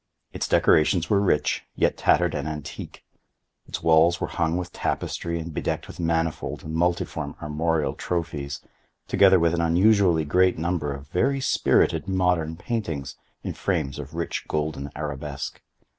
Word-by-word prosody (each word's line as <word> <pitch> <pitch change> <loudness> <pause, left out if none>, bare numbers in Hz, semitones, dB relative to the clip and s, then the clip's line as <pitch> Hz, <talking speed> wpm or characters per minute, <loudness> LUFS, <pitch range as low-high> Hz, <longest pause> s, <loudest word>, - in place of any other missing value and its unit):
Its - - -2
decorations 80 +2 +3
were 100 -1 +4
rich, 75 -8 +1
yet - - +2
tattered 90 -2 +2
and 70 - -3
antique. 75 -2 -7 0.6
Its - - -5
walls 80 +2 +5
were - - -1
hung 85 0 -1
with 90 -1 -5
tapestry 85 0 -2
and 80 0 -6
bedecked - - -2
with - - -11
manifold 80 -1 -1
and 80 - -6
multiform 85 +1 -1
armorial 75 -1 0
trophies, 75 -4 -3 0.5
together 95 -2 +5
with 85 0 +2
an 85 - +1
unusually 90 -1 +4
great 90 +4 +3
number 80 -3 -1
of 70 +1 -7
very 135 +11 +1
spirited 135 - +2
modern 90 -4 +1
paintings 85 - -3 0.3
in - - -3
frames 70 +1 -2
of 75 +2 -8
rich 85 0 -3
golden 75 -2 -2
arabesque. 75 -2 -5
80 Hz, 145 wpm, -25 LUFS, 75-90 Hz, 0.6 s, walls